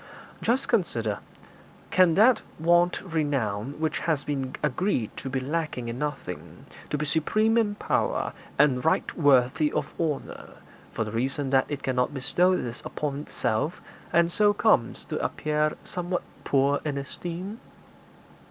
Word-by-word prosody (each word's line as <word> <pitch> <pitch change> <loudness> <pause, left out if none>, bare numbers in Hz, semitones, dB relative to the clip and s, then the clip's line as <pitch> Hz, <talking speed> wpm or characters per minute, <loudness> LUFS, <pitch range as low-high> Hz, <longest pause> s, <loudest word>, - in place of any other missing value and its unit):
Just 255 +4 +1
consider: 115 - 0 0.7
can 180 -3 +5
that 220 +2 +6 0.2
want 175 +2 +3
renown 140 - -1
which 160 -1 0
has 155 -4 0
been 135 -3 -3
agreed 150 - 0
to 135 - -5
be 135 0 -1
lacking 140 -3 -2
in 120 +2 -5
nothing, 145 -12 -5 0.2
to 150 - 0
be 150 - -1
supreme 215 +9 +2
in 215 -3 +2
power, - - 0 0.2
and 135 -3 +4
right 160 - +1
worthy 145 -1 +4
of 150 -1 -2
honour, 155 -4 -3 0.4
for - - -1
the 105 - -6
reason 135 +4 -1
that 135 -1 +4
it 145 -2 -4
cannot 130 +2 0
bestow 180 +7 +2
this 120 0 -5
upon 145 -2 -3
itself, 145 +1 -2 0.3
and 170 0 +3
so 205 +2 +4
comes 205 - +2
to - - -3
appear 150 0 0
somewhat 180 0 -3 0.2
poor 140 +1 +2
in 145 -2 -2
esteem?' 175 - -6
150 Hz, 145 wpm, -27 LUFS, 135-175 Hz, 0.7 s, that